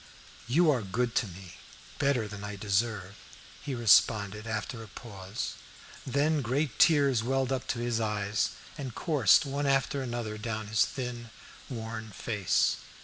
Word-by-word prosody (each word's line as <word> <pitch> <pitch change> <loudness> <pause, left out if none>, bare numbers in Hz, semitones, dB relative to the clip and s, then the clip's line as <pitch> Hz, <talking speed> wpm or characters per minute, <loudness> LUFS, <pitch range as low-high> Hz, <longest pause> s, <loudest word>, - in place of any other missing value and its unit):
"You 155 +6 +4
are 130 -5 +1
good 115 +4 -1
to 110 - +2
me; 90 -1 -11 0.4
better 140 -6 +2
than 105 -1 -8
I 105 0 -5
deserve," 100 -1 -1 0.5
he 140 -3 -4
responded, 110 -2 +4
after 110 +1 -3
a 110 - -9
pause. 100 -1 -6 0.5
Then 145 +3 +2
great 130 0 -1
tears 140 -7 +5
welled 135 +2 0
up 130 -1 -2
to - - -1
his 120 -1 0
eyes, 105 -2 0 0.3
and 130 -5 -5
coursed 150 - +4
one 140 +1 -1
after 135 0 +1
another 120 -4 -4
down 110 0 -3
his 110 - +4
thin, 125 -3 -5 0.4
worn 110 -3 -5
face. 105 -1 +1
115 Hz, 145 wpm, -29 LUFS, 105-135 Hz, 0.5 s, tears